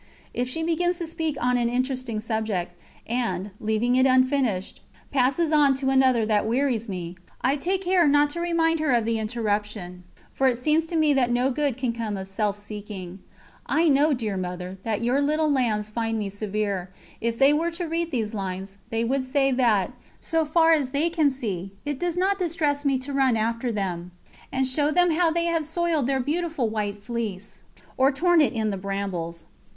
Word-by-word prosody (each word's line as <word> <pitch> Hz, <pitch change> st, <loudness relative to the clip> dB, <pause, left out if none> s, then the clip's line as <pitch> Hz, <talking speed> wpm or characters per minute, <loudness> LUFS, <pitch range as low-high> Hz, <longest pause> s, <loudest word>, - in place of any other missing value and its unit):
If 250 Hz, +1 st, -2 dB
she 325 Hz, +5 st, -3 dB
begins 350 Hz, +2 st, +1 dB
to 345 Hz, -, -3 dB
speak 320 Hz, -3 st, -2 dB
on 250 Hz, 0 st, +2 dB
an 235 Hz, -1 st, +1 dB
interesting 255 Hz, -2 st, -2 dB
subject, 215 Hz, -5 st, -2 dB, 0.3 s
and, 210 Hz, -5 st, -2 dB
leaving 220 Hz, +3 st, 0 dB
it 260 Hz, +1 st, +4 dB
unfinished, 255 Hz, -7 st, +1 dB, 0.3 s
passes 280 Hz, +5 st, +2 dB
on 290 Hz, -3 st, +4 dB
to 265 Hz, 0 st, 0 dB
another 260 Hz, -4 st, +4 dB
that 215 Hz, -1 st, +1 dB
wearies 240 Hz, -2 st, 0 dB
me, 180 Hz, -2 st, -5 dB, 0.2 s
I 265 Hz, +2 st, +2 dB
take 370 Hz, +6 st, -1 dB
care 360 Hz, -3 st, +3 dB
not 290 Hz, +1 st, +4 dB
to 340 Hz, -, -4 dB
remind 330 Hz, -1 st, +1 dB
her 305 Hz, -3 st, +1 dB
of 235 Hz, -2 st, +2 dB
the 230 Hz, -1 st, 0 dB
interruption, 210 Hz, -5 st, -3 dB, 0.3 s
for 265 Hz, -, +2 dB
it 250 Hz, -2 st, +2 dB
seems 310 Hz, +5 st, +1 dB
to 335 Hz, -, -4 dB
me 310 Hz, -2 st, +4 dB
that 260 Hz, -3 st, +2 dB
no 245 Hz, +2 st, +2 dB
good 280 Hz, -2 st, -1 dB
can 255 Hz, -3 st, -1 dB
come 225 Hz, -3 st, -3 dB
of 190 Hz, 0 st, -6 dB
self 205 Hz, +1 st, -1 dB
seeking. 205 Hz, -3 st, -8 dB, 0.5 s
I 330 Hz, +1 st, +2 dB
know, 290 Hz, +2 st, +4 dB
dear 220 Hz, -7 st, -1 dB
Mother, 180 Hz, +1 st, -5 dB
that 220 Hz, +1 st, -2 dB
your 250 Hz, +4 st, +2 dB
little 305 Hz, +1 st, +1 dB
lambs 220 Hz, -6 st, 0 dB
find 225 Hz, 0 st, -2 dB
me 205 Hz, -2 st, -2 dB
severe; 200 Hz, -2 st, -3 dB, 0.3 s
if 230 Hz, 0 st, -1 dB
they 275 Hz, +3 st, +5 dB
were 325 Hz, +3 st, +1 dB
to 340 Hz, +1 st, -4 dB
read 335 Hz, +1 st, -2 dB
these 225 Hz, -7 st, -2 dB
lines, 195 Hz, 0 st, -5 dB
they 225 Hz, 0 st, -1 dB
would 265 Hz, +2 st, 0 dB
say 270 Hz, +1 st, +1 dB
that, 235 Hz, -5 st, +2 dB, 0.3 s
so 325 Hz, -1 st, 0 dB
far 325 Hz, +2 st, +4 dB
as 290 Hz, -5 st, +1 dB
they 300 Hz, +5 st, 0 dB
can 315 Hz, -4 st, +3 dB
see, 195 Hz, -8 st, -5 dB
it 290 Hz, -2 st, -3 dB
does 350 Hz, -1 st, -2 dB
not 390 Hz, +2 st, +1 dB
distress 300 Hz, -5 st, 0 dB
me 275 Hz, -1 st, +3 dB
to 270 Hz, +2 st, -6 dB
run 265 Hz, -4 st, +3 dB
after 230 Hz, +2 st, -1 dB
them, 180 Hz, -4 st, -3 dB, 0.4 s
and 265 Hz, 0 st, +1 dB
show 290 Hz, +3 st, +2 dB
them 355 Hz, +2 st, +3 dB
how 335 Hz, +1 st, +3 dB
they 335 Hz, +1 st, 0 dB
have 335 Hz, -2 st, +1 dB
soiled 320 Hz, -3 st, 0 dB
their 270 Hz, -1 st, +1 dB
beautiful 310 Hz, -1 st, -1 dB
white 205 Hz, -2 st, -3 dB
fleece, 220 Hz, -4 st, -5 dB, 0.4 s
or 265 Hz, +2 st, +4 dB
torn 340 Hz, +4 st, +3 dB
it 290 Hz, -, +2 dB
in 220 Hz, -2 st, 0 dB
the 195 Hz, -, -3 dB
brambles. 185 Hz, -4 st, -4 dB
255 Hz, 195 wpm, -25 LUFS, 215-300 Hz, 0.5 s, they